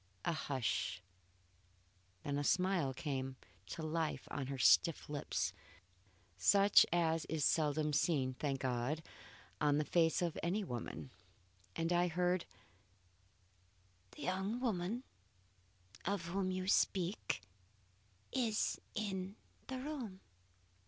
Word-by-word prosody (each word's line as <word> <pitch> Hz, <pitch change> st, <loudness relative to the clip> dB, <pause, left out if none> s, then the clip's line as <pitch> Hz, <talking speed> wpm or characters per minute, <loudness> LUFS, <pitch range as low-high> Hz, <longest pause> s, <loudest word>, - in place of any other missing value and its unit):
A 170 Hz, -, +2 dB
hush. 125 Hz, -, -1 dB, 1.2 s
Then 145 Hz, 0 st, -1 dB
a -, -, -1 dB
smile 180 Hz, -3 st, +2 dB
came 130 Hz, -1 st, -3 dB, 0.3 s
to 160 Hz, +10 st, -5 dB
life 160 Hz, 0 st, -1 dB
on 140 Hz, -3 st, -3 dB
her 135 Hz, 0 st, -3 dB
stiff 160 Hz, +4 st, +5 dB
lips, 145 Hz, -1 st, -1 dB, 0.9 s
such 200 Hz, -, +6 dB
as 165 Hz, -2 st, +2 dB
is 155 Hz, -3 st, 0 dB
seldom 150 Hz, -1 st, +2 dB
seen, 140 Hz, -4 st, +2 dB
thank 135 Hz, 0 st, -2 dB
God, 130 Hz, +5 st, -1 dB, 0.6 s
on 145 Hz, -1 st, +4 dB
the 150 Hz, -, +1 dB
face 165 Hz, +1 st, +3 dB
of 170 Hz, -2 st, -1 dB
any 185 Hz, +6 st, 0 dB
woman, 110 Hz, -, -5 dB, 0.6 s
and 165 Hz, +1 st, 0 dB
I 175 Hz, +1 st, +3 dB
heard: 180 Hz, +1 st, +1 dB, 1.7 s
"The -, -, -8 dB
young 190 Hz, +5 st, -1 dB
relative 225 Hz, 0 st, -1 dB, 1.0 s
of 195 Hz, -2 st, -1 dB
whom 190 Hz, +1 st, 0 dB
you 185 Hz, 0 st, -2 dB
speak, 185 Hz, -, +1 dB, 0.9 s
is 230 Hz, -4 st, 0 dB
in 195 Hz, -2 st, -3 dB, 0.3 s
the 260 Hz, -, -3 dB
room. 255 Hz, -8 st, -5 dB
165 Hz, 110 wpm, -37 LUFS, 145-190 Hz, 1.7 s, such